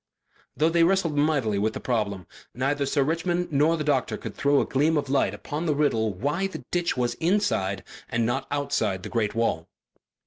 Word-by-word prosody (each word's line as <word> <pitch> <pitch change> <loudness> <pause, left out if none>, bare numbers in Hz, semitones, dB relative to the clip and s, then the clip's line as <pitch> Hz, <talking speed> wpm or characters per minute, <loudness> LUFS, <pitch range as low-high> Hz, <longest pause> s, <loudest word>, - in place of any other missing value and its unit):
Though 155 +2 +3
they 165 0 +3
wrestled 175 -3 +2
mightily 145 -9 +1
with 110 +2 0
the - - -5
problem, 100 -7 -2 0.3
neither 140 +2 0
Sir 140 0 +2
Richmond 175 +3 -1
nor 155 +4 +3
the 155 - -2
doctor 145 -4 0
could - - -7
throw 140 0 +2
a - - +1
gleam 150 +4 +2
of 140 -2 -2
light 140 - +2
upon 155 +3 -4
the 150 - +2
riddle 115 -7 +1
why 145 - -1
the 195 - -9
ditch 175 -5 0
was 120 -1 0
inside 165 - +1 0.3
and 120 -2 0
not 130 +4 -1
outside 140 -10 -1
the 110 - -6
great 115 -3 -1
wall. 115 -8 0
140 Hz, 195 wpm, -26 LUFS, 115-160 Hz, 0.3 s, Though